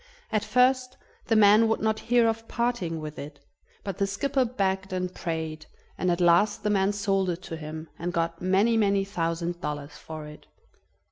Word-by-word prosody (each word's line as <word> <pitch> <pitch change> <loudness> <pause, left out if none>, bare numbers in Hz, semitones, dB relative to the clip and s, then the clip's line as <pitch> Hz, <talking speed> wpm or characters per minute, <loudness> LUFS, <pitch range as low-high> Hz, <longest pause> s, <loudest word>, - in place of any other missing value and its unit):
At 215 -2 +1
first 255 +2 +2 0.3
the 225 - +2
man 215 +1 +6
would 225 - +1
not 220 0 0
hear 240 -1 +5
of 225 0 -2
parting 235 -9 -1
with 155 0 -7
it, 145 0 -9 0.4
but 195 -1 -5
the 200 - +2
skipper 265 +7 0
begged 195 -5 -1
and 185 0 -2
prayed, 160 -2 -4 0.3
and 185 - -1
at 175 0 +1
last 175 +5 +3
the 210 - +1
man 195 0 +2
sold 195 -2 0
it 175 0 -4
to 165 - -6
him, 155 0 -7
and 175 +2 -2
got 165 -1 -2
many, 195 +5 +3
many 200 -2 +2
thousand 170 -2 -2
dollars 145 0 -5
for 155 -1 -8
it. 150 0 -12
190 Hz, 185 wpm, -27 LUFS, 165-215 Hz, 0.4 s, man